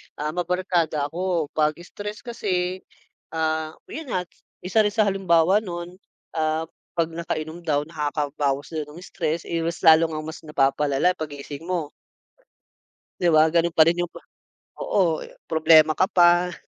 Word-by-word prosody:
Ah, 150 Hz, +1 st, -3 dB
mabarkada 175 Hz, -4 st, -1 dB
ako, 175 Hz, -3 st, -1 dB
pag 155 Hz, 0 st, +1 dB
stress 210 Hz, +4 st, -8 dB
kasi, 185 Hz, -6 st, -2 dB, 0.6 s
ah, 160 Hz, 0 st, -1 dB, 0.2 s
yun 320 Hz, -1 st, -6 dB
nga, 180 Hz, -, 0 dB, 0.4 s
isa 185 Hz, +4 st, +1 dB
rin 210 Hz, -1 st, +2 dB
sa 220 Hz, -, +4 dB
halimbawa 190 Hz, -2 st, +3 dB
nun, 175 Hz, -2 st, -7 dB, 0.3 s
ah, 155 Hz, 0 st, 0 dB, 0.3 s
pag 165 Hz, -1 st, 0 dB
nakainom 160 Hz, 0 st, -4 dB
daw 150 Hz, -4 st, 0 dB
nakakabawas 145 Hz, -2 st, -2 dB
daw 155 Hz, -2 st, -2 dB
ng 175 Hz, -, -10 dB
stress, 165 Hz, -2 st, -3 dB
eh, 170 Hz, -, -2 dB
mas 165 Hz, +1 st, -3 dB
lalo 160 Hz, 0 st, +7 dB
ngang 155 Hz, -1 st, -5 dB
mas 160 Hz, +1 st, -7 dB
napapalala 140 Hz, +2 st, +2 dB
pag 155 Hz, -2 st, -4 dB
gising 145 Hz, +3 st, -8 dB
mo. 170 Hz, -5 st, -2 dB, 1.3 s
Di 175 Hz, -, +2 dB
ba 155 Hz, -2 st, +6 dB
ganun 170 Hz, 0 st, +1 dB
pa 160 Hz, -, +8 dB
rin 170 Hz, +2 st, +2 dB
yung 175 Hz, -, 0 dB
prob -, -, -14 dB, 0.6 s
oo, 170 Hz, -5 st, +1 dB
eh, -, -, -12 dB, 0.2 s
problema 160 Hz, -1 st, +6 dB
ka 185 Hz, -, +4 dB
pa. 175 Hz, -1 st, +4 dB
165 Hz, 155 wpm, -24 LUFS, 155-180 Hz, 1.3 s, pa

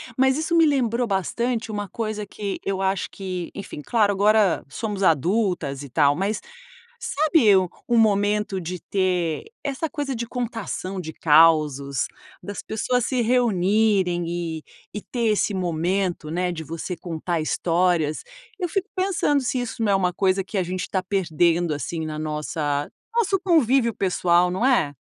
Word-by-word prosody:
Mas 265 Hz, +1 st, +3 dB
isso 320 Hz, +2 st, 0 dB
me 330 Hz, -1 st, +6 dB
lembrou 245 Hz, -4 st, +1 dB
bastante 225 Hz, +4 st, -1 dB
uma 205 Hz, -2 st, -4 dB
coisa 215 Hz, -2 st, -4 dB
que 200 Hz, -1 st, -5 dB
eu 195 Hz, -1 st, -2 dB
acho 190 Hz, 0 st, 0 dB
que, 185 Hz, -3 st, -5 dB
enfim, 195 Hz, -6 st, -7 dB
claro, 210 Hz, +4 st, +2 dB
agora 205 Hz, -1 st, +3 dB
somos 205 Hz, -, -4 dB
adultas 170 Hz, -, +1 dB
e 140 Hz, -, -9 dB
tal. 145 Hz, +1 st, +3 dB
Mas 195 Hz, +6 st, -1 dB, 0.6 s
sabe 310 Hz, -, +3 dB, 0.3 s
um 240 Hz, -, +3 dB
momento 205 Hz, -2 st, +2 dB
de 180 Hz, +1 st, -5 dB
ter 180 Hz, -4 st, -1 dB, 0.2 s
essa 280 Hz, +3 st, -2 dB
coisa 290 Hz, -3 st, -3 dB
de 235 Hz, 0 st, -3 dB
contação 225 Hz, -6 st, -4 dB
de 160 Hz, -2 st, -6 dB
causos, 150 Hz, -4 st, +3 dB, 0.3 s
das 205 Hz, 0 st, -6 dB
pessoas 245 Hz, +3 st, -1 dB
se 255 Hz, -2 st, 0 dB
reunirem 205 Hz, -5 st, +2 dB
e 165 Hz, -2 st, -4 dB, 0.3 s
e 210 Hz, -, -4 dB
ter 235 Hz, +1 st, -2 dB
esse 210 Hz, -1 st, +1 dB
momento, 175 Hz, -1 st, -1 dB
né, 180 Hz, +1 st, 0 dB
de 160 Hz, -2 st, -5 dB
você 165 Hz, +3 st, -5 dB
contar 170 Hz, 0 st, -3 dB
histórias. 165 Hz, -1 st, +1 dB, 0.3 s
Eu 360 Hz, -3 st, -1 dB
fico 390 Hz, +4 st, -2 dB
pensando 370 Hz, -6 st, +1 dB
se 255 Hz, 0 st, -1 dB
isso 235 Hz, -1 st, -4 dB
não 205 Hz, -, +2 dB
é -, -, +4 dB
uma 180 Hz, -2 st, +1 dB
coisa 190 Hz, +1 st, +1 dB
que 195 Hz, +2 st, -4 dB
a 185 Hz, -, +1 dB
gente 180 Hz, +1 st, -4 dB
está 190 Hz, -, -1 dB
perdendo 175 Hz, -3 st, +1 dB
assim 160 Hz, +2 st, -4 dB
na 155 Hz, -1 st, -5 dB
nossa 150 Hz, -1 st, -2 dB, 0.3 s
nosso 390 Hz, -5 st, +2 dB
convívio 270 Hz, -, +3 dB
pessoal, 180 Hz, -2 st, +2 dB
não 185 Hz, +6 st, -1 dB
é? 235 Hz, -, +3 dB
195 Hz, 160 wpm, -23 LUFS, 170-230 Hz, 0.6 s, me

